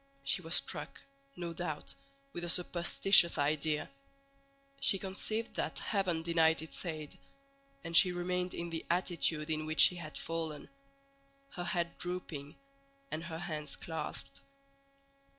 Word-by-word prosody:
She -, -, +1 dB
was -, -, +2 dB
struck, -, -, +1 dB, 0.4 s
no 170 Hz, -1 st, -5 dB
doubt, 160 Hz, -3 st, -4 dB, 0.4 s
with 175 Hz, -, -5 dB
a 175 Hz, -, 0 dB
superstitious 175 Hz, +1 st, +5 dB
idea; 150 Hz, +1 st, 0 dB, 0.9 s
she 195 Hz, -, +4 dB
conceived 210 Hz, +4 st, -3 dB
that -, -, -2 dB
heaven 185 Hz, -6 st, 0 dB
denied 165 Hz, -1 st, +3 dB
its 160 Hz, -, -2 dB
aid, 155 Hz, -3 st, -6 dB, 0.6 s
and 165 Hz, -, -4 dB
she 180 Hz, +2 st, +8 dB
remained 180 Hz, +1 st, -2 dB
in 170 Hz, 0 st, -5 dB
the 165 Hz, -, -4 dB
attitude 170 Hz, -3 st, +1 dB
in 155 Hz, 0 st, -2 dB
which 155 Hz, 0 st, +4 dB
she 180 Hz, -, +7 dB
had 155 Hz, -3 st, -7 dB
fallen, 160 Hz, -3 st, -4 dB, 0.8 s
her 175 Hz, -2 st, -5 dB
head 175 Hz, -4 st, -1 dB
drooping 165 Hz, -5 st, -5 dB, 0.6 s
and 160 Hz, +2 st, -3 dB
her 165 Hz, -1 st, -5 dB
hands 150 Hz, -4 st, -3 dB
clasped. 160 Hz, -2 st, -6 dB
170 Hz, 135 wpm, -33 LUFS, 155-180 Hz, 0.9 s, she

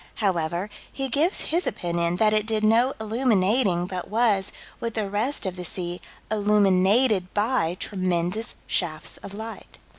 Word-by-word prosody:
However, 180 Hz, 0 st, -1 dB, 0.2 s
he 270 Hz, -1 st, -3 dB
gives 310 Hz, +9 st, +1 dB
his 345 Hz, +3 st, +2 dB
opinion 170 Hz, 0 st, -1 dB
that 215 Hz, +3 st, +3 dB
it 215 Hz, 0 st, +1 dB
did 220 Hz, -1 st, 0 dB
no 230 Hz, +5 st, +4 dB
illuminating 215 Hz, -4 st, +2 dB
but 180 Hz, -1 st, -5 dB
was, 215 Hz, -3 st, +2 dB, 0.3 s
with 230 Hz, -1 st, -4 dB
the 215 Hz, -3 st, -1 dB
rest 215 Hz, +8 st, -1 dB
of 185 Hz, -1 st, -2 dB
the 180 Hz, -, -6 dB
sea, 175 Hz, 0 st, -4 dB, 0.3 s
illuminated 205 Hz, 0 st, +3 dB
by 205 Hz, -6 st, +1 dB
tremendous 185 Hz, +3 st, -2 dB
shafts 155 Hz, -3 st, -2 dB
of 200 Hz, -, -9 dB
light. 220 Hz, +2 st, -8 dB
205 Hz, 145 wpm, -25 LUFS, 180-225 Hz, 0.3 s, no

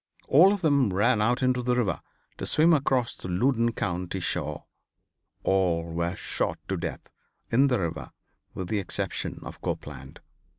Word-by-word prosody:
All 175 Hz, +8 st, +7 dB
of 205 Hz, -2 st, -1 dB
them 140 Hz, -, +3 dB
ran 105 Hz, +4 st, +2 dB
out 120 Hz, +4 st, +1 dB
into 130 Hz, -1 st, +2 dB
the 125 Hz, 0 st, +1 dB
river 110 Hz, -8 st, 0 dB, 0.4 s
to -, -, -4 dB
swim 165 Hz, +2 st, +5 dB
across 130 Hz, -5 st, +1 dB
to -, -, -8 dB
the 90 Hz, -, -3 dB
Loudon 115 Hz, +2 st, +2 dB
County 90 Hz, -3 st, -3 dB
shore. 75 Hz, -4 st, -2 dB, 0.8 s
All 90 Hz, -4 st, +2 dB
were 85 Hz, +2 st, -2 dB
shot -, -, -2 dB
to -, -, 0 dB
death -, -, -5 dB, 0.4 s
in 135 Hz, +4 st, +5 dB
the 125 Hz, -4 st, +1 dB
river 80 Hz, -3 st, -3 dB, 0.5 s
with 95 Hz, -2 st, -5 dB
the 110 Hz, -, 0 dB
exception 95 Hz, -, -3 dB
of -, -, -9 dB
Copeland. -, -, -6 dB
110 Hz, 165 wpm, -27 LUFS, 90-130 Hz, 0.8 s, All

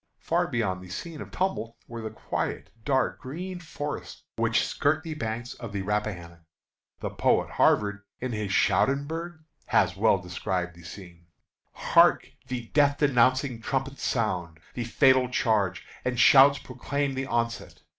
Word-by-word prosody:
Far -, -, 0 dB
beyond 95 Hz, -6 st, -1 dB
the 90 Hz, -, -11 dB
scene 155 Hz, -, -6 dB
of -, -, -8 dB
tumult 115 Hz, -, -2 dB
were 115 Hz, -1 st, -7 dB
the 110 Hz, -, -4 dB
quiet, 110 Hz, -, -4 dB
dark 130 Hz, -1 st, +1 dB
green 180 Hz, +7 st, -6 dB
forests 150 Hz, -3 st, -6 dB
which -, -, +2 dB
skirt 155 Hz, +2 st, 0 dB
the 160 Hz, -2 st, -5 dB
banks 120 Hz, -4 st, -4 dB
of 115 Hz, -3 st, -9 dB
the 100 Hz, -1 st, -2 dB
Rappahannock. 95 Hz, -5 st, -3 dB, 0.6 s
The -, -, -3 dB
poet -, -, +1 dB
Havard, 100 Hz, -1 st, +2 dB, 0.2 s
in 130 Hz, 0 st, -3 dB
his 105 Hz, -3 st, -3 dB
"Scauderberg," 155 Hz, -, +1 dB, 0.2 s
has -, -, +2 dB
well -, -, +4 dB
described 90 Hz, 0 st, -3 dB
the 85 Hz, -, -15 dB
scene: 85 Hz, 0 st, -12 dB, 0.5 s
"Hark! -, -, +4 dB, 0.2 s
the 125 Hz, -3 st, -5 dB
death 145 Hz, -1 st, +3 dB
denouncing 130 Hz, -2 st, +2 dB
trumpet 135 Hz, +3 st, -2 dB
sounds. 90 Hz, -9 st, -1 dB, 0.2 s
The 120 Hz, -, -3 dB
fatal 130 Hz, +1 st, +4 dB
charge, 110 Hz, -7 st, 0 dB, 0.2 s
and 125 Hz, -1 st, -1 dB
shouts 140 Hz, +2 st, +7 dB
proclaim 135 Hz, +2 st, -3 dB
the 135 Hz, 0 st, -3 dB
onset. 115 Hz, -1 st, -3 dB
120 Hz, 145 wpm, -27 LUFS, 105-140 Hz, 0.6 s, shouts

